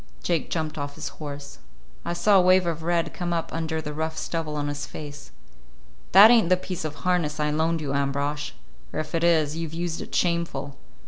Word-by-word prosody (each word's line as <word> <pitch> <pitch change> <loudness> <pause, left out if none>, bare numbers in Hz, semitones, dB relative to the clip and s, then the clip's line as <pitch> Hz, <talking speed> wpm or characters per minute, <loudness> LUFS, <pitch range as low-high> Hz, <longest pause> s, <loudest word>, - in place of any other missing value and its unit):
Jake 165 -3 0
jumped 155 -2 -2
off 145 0 -4
his - - -5
horse. 145 -1 -7 0.4
I - - -2
saw 190 +3 +4
a - - +6
wave 185 0 +5
of 165 -1 -2
red 170 -1 0
come 175 -1 -2
up 165 -1 -2
under 160 -1 -2
the 150 - -5
rough 160 +1 -3
stubble 160 -3 -3
on 145 -1 -1
his 145 -2 -4
face. 145 0 -9 0.8
"That 205 +5 +10
ain't 225 -8 +5
the 185 - +5
piece 185 -2 -5
of 155 -1 -4
harness 170 -5 +1
I 150 0 +1
loaned 160 +2 +1
you, 140 -2 -3
Ambrosch; 140 +1 -1 0.4
or - - -3
if 155 - -5
it 165 0 0
is, 160 -3 +3
you've 165 -1 -4
used 170 -1 -3
it - - -7
shameful. 170 -5 0
160 Hz, 205 wpm, -25 LUFS, 150-170 Hz, 0.8 s, That